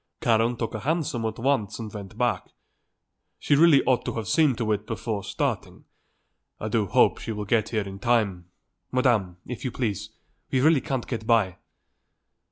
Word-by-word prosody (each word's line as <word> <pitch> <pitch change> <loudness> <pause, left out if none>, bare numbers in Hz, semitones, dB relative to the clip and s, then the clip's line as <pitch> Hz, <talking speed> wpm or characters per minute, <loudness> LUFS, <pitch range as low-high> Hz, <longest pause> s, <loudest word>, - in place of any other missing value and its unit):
Karen 115 +1 +2
took 115 - -3
a 110 - -3
hansom 140 -3 -1
at 110 0 -3
once 115 -5 0
and 110 -3 -7
went 100 -3 -8
back. - - 0 0.9
She 145 - +2
really 155 -2 +6
ought 130 -2 +2
to - - -2
have 110 -3 -4
seen 150 - +3
to 110 -1 -1
it 105 0 -1
before 110 -3 -3
starting. - - -3 0.7
I 110 - -3
do 110 -2 +1
hope - - +3
she - - -5
will 105 -1 -4
get 110 +1 +1
him 110 -3 0
here - - -8
in 100 - -10
time. 100 -7 0 0.4
Madam, 115 -9 +1
if 125 - -7
you 130 - -1
please; 105 -4 -3 0.4
we 130 - +1
really 150 +1 +4
can't 135 -5 -3
get 110 -3 -5
by." 110 -6 +3
115 Hz, 180 wpm, -25 LUFS, 105-125 Hz, 0.9 s, really